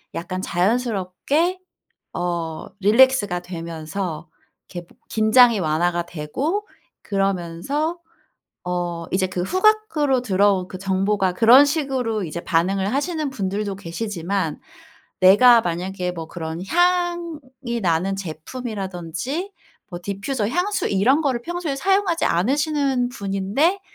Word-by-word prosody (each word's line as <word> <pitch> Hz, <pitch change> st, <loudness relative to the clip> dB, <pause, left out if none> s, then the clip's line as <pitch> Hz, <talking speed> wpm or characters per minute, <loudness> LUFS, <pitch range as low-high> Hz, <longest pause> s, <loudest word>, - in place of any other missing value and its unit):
약간 185 Hz, +2 st, -4 dB
자연스럽게 230 Hz, -, 0 dB, 0.5 s
어 170 Hz, -2 st, -3 dB
릴렉스가 210 Hz, -3 st, +4 dB
되면서 170 Hz, 0 st, -5 dB, 0.4 s
이렇게 175 Hz, -2 st, -8 dB
뭐 -, -, -24 dB
긴장이 225 Hz, 0 st, +5 dB
완화가 170 Hz, +2 st, 0 dB
되고 265 Hz, -, -3 dB, 0.4 s
그러면서 195 Hz, -, -1 dB, 0.6 s
어 175 Hz, -2 st, -3 dB
이제 185 Hz, 0 st, +1 dB
그 185 Hz, -1 st, -4 dB
후각으로 370 Hz, -, +2 dB
들어온 195 Hz, -4 st, +2 dB
그 -, -, -7 dB
정보가 195 Hz, 0 st, 0 dB
그런 235 Hz, +8 st, +7 dB
식으로 265 Hz, -, -1 dB
이제 170 Hz, +1 st, -5 dB
반응을 190 Hz, +5 st, 0 dB
하시는 305 Hz, 0 st, -1 dB
분들도 200 Hz, -3 st, -3 dB
계시지만. 180 Hz, -2 st, -3 dB, 0.6 s
내가 230 Hz, +5 st, +7 dB
만약에 180 Hz, +1 st, -3 dB
뭐 165 Hz, -2 st, -7 dB
그런 160 Hz, -1 st, -5 dB
향이 335 Hz, -, -1 dB
나는 180 Hz, +2 st, +1 dB
제품이라든지 195 Hz, -, -5 dB, 0.4 s
뭐 175 Hz, -, -6 dB
디퓨저, 205 Hz, +4 st, -2 dB
향수 360 Hz, -, 0 dB
이런 245 Hz, +11 st, +3 dB
거를 260 Hz, -5 st, 0 dB
평소에 345 Hz, -3 st, -3 dB
사용하지 385 Hz, +2 st, +1 dB
않으시는 270 Hz, -, +1 dB
분인데 210 Hz, -, 0 dB
200 Hz, 270 characters per minute, -22 LUFS, 180-275 Hz, 0.6 s, 그런